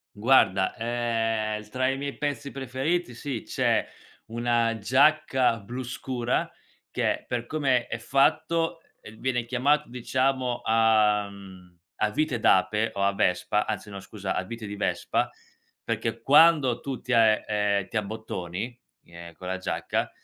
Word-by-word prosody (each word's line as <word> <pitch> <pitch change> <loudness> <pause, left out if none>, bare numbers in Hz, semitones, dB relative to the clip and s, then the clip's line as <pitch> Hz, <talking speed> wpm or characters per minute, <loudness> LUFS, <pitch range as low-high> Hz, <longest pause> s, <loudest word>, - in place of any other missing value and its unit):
Guarda, 105 -4 +3
ehm, 115 -2 -1
l 105 - -16
tra 130 +3 0
i 135 - 0
miei 140 0 -5
pezzi 145 -1 -3
preferiti 135 +4 -2
sì, 125 -1 -5
c'è - - +1 0.4
una 115 0 0
giacca 130 0 +3
blu 120 +6 -6
scura 125 0 -2 0.4
che - - -1
per 120 -1 -2
come 130 -4 +1
è - - -4
fatto, 165 +7 +1 0.2
uhm, 110 0 -12
viene 125 -2 -1
chiamato 140 +5 +1
diciamo 125 +1 -1
a 110 -2 +3
mhmm, 95 -3 -14 0.2
a 110 - +3
vite 150 -3 0
d'ape 105 +3 +3
o 100 - 0
a 100 0 +2
vespa 100 +2 +1
anzi 105 -1 -4
no 100 - -7
scusa 95 -1 -5
a - - 0
vite 115 +3 -7
di 105 0 -6
vespa 105 - 0 0.5
perché - - -3
quando 145 -4 +5
tu 135 -3 -5
ti 130 - -6
a 115 -1 +6
ehm, - - -4
ehm, 100 -2 0
ti 115 - -3
abbottoni, 110 +1 -5 0.3
ehm, 85 0 -11
con 90 +2 -10
la 95 +1 -2
giacca 95 - -2
115 Hz, 150 wpm, -26 LUFS, 105-130 Hz, 0.5 s, a